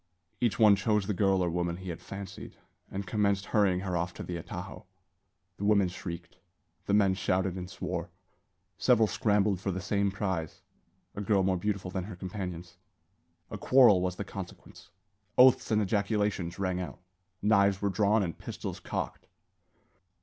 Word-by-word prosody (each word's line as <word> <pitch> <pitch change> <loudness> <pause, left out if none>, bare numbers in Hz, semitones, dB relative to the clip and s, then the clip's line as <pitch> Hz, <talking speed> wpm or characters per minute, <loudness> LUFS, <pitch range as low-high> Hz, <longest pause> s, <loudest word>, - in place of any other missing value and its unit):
Each 120 -3 +1
one 105 -2 +7
chose 105 0 +1
the 105 - -1
girl 95 -1 +2
or 90 - +1
woman 85 0 -1
he 95 0 -7
had 85 - -6
fancied, 95 -1 -8 0.3
and 100 +1 -4
commenced 100 -1 +1
hurrying 100 -4 +2
her 95 -2 -2
off 85 +1 -2
to - - -6
the 90 - -5
atajo. 90 +3 -7 0.7
The - - -6
women 100 -3 +4
shrieked. 85 -1 -8 0.5
The 100 - +3
men 100 -2 +4
shouted 95 0 0
and 90 -1 -6
swore. 90 -3 -4 0.7
Several 120 -3 +4
scrambled 105 -3 +1
for 95 - -3
the 95 0 -2
same 100 +2 0
prize 95 -5 -3 0.5
a 105 - -5
girl 100 -1 +2
more 95 0 +2
beautiful 95 0 -2
than 95 -1 -3
her 100 -2 -8
companions. 90 -2 -6 0.7
A - - -5
quarrel 120 -8 +6
was 90 -1 -1
the 100 - -4
consequence. 95 -3 -10 0.5
Oaths 130 0 +6
and 110 -2 +3
ejaculations 100 -3 -1
rang 95 -2 -1
out; 90 - -7 0.4
knives 100 -2 +4
were 100 - 0
drawn 105 +2 +2
and 85 -4 -3
pistols - - -6
cocked. - - -5
95 Hz, 165 wpm, -29 LUFS, 90-105 Hz, 0.7 s, one